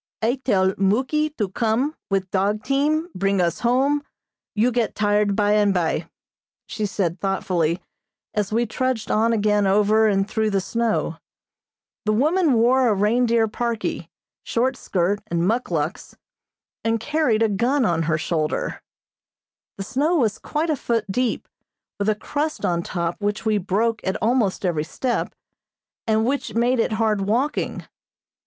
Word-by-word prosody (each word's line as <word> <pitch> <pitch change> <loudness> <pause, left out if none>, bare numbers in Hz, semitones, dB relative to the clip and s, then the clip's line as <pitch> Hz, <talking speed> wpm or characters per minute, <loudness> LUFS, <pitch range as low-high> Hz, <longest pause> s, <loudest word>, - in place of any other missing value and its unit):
"I 245 +4 +1
tell 190 -5 +2
Muky 260 +10 +1
to 210 -4 -1
come 230 +8 0 0.2
with 195 -2 -1
dog 200 +2 0
team, 305 +5 +1
bring 195 +1 0
us 170 -1 0
home, 270 +5 +2 0.5
you 230 +4 +3
get 235 -1 -1
tired 205 -1 +2
by 205 0 +2
and 205 -2 +3
by," 165 -1 -1 0.6
she 215 -1 -3
said 180 -3 -2
thoughtfully, 180 -3 0 0.5
as 210 -1 -1
we 235 +2 +1
trudged 240 -1 -2
on 225 +2 +3
again 210 -2 +2
over 210 +2 +4
and 195 -1 +1
through 220 0 0
the 200 -2 +1
snow. 230 +3 -1 0.9
The 215 - +2
woman 310 - +3
wore 245 +3 +4
a 215 - +3
reindeer 225 +2 +2
parkie, 235 0 -3 0.3
short 255 +3 0
skirt, 195 -2 -1
and 170 +1 0
muckluks, 180 -8 -2 0.7
and 225 0 +1
carried 255 -4 +1
a - - +4
gun 240 +6 +1
on 170 -3 +1
her 155 - +2
shoulder. 155 -1 -2 1.0
The 195 - -4
snow 290 - 0
was 230 -9 +1
quite 315 +2 -1
a - - +1
foot 235 -4 -1
deep, 250 +3 -1 0.5
with 200 +1 +1
a 215 - +2
crust 295 +8 -3
on 170 -1 +1
top 170 +1 -3
which 205 +2 -2
we 215 -1 +2
broke 215 +4 0
at 190 - -1
almost 220 -5 +1
every 165 -4 0
step, 245 +9 -2 0.7
and 220 0 +2
which 275 0 -2
made 240 +2 +2
it 225 - +1
hard 215 -2 +1
walking. 240 +9 -1
215 Hz, 150 wpm, -22 LUFS, 195-245 Hz, 1.0 s, over